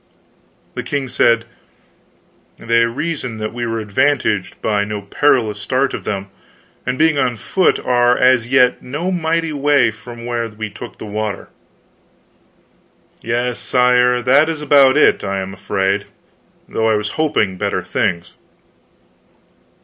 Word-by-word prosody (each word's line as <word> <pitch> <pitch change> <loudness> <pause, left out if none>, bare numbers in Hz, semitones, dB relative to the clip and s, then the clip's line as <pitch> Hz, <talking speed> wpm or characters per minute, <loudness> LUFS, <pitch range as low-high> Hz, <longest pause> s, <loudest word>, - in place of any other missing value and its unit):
The - - -4
king 140 -2 -3
said: 115 -2 +2 1.1
"They 115 0 +2
reason 125 -1 -4
that 110 0 -4
we 120 0 -3
were 115 0 -2
advantaged 105 -2 0
by 105 -2 0
no 105 0 -5
parlous 110 -1 +1
start 135 +3 0
of - - -6
them, 100 -1 -4 0.6
and 125 0 -1
being 155 -1 +3
on 125 -2 +1
foot 185 - +1
are 120 0 +3
as 125 -2 +3
yet 125 -1 +3
no 150 +9 -4
mighty 165 -2 -1
way 140 -4 +3
from 120 +2 -11
where 120 -1 -2
we 110 0 -7
took 120 - -10
the - - -8
water." 105 -1 -4 1.7
"Yes, 120 +1 -2
sire, 125 0 +2
that 140 +5 +4
is 160 -2 -3
about 140 -2 +5
it, - - +4
I 100 -1 -2
am 95 0 -5
afraid, 95 +1 -1 0.6
though 110 0 0
I 110 - +3
was 105 0 -2
hoping 110 -12 0
better 100 -1 -1
things." 85 0 -2
120 Hz, 140 wpm, -18 LUFS, 105-135 Hz, 1.7 s, about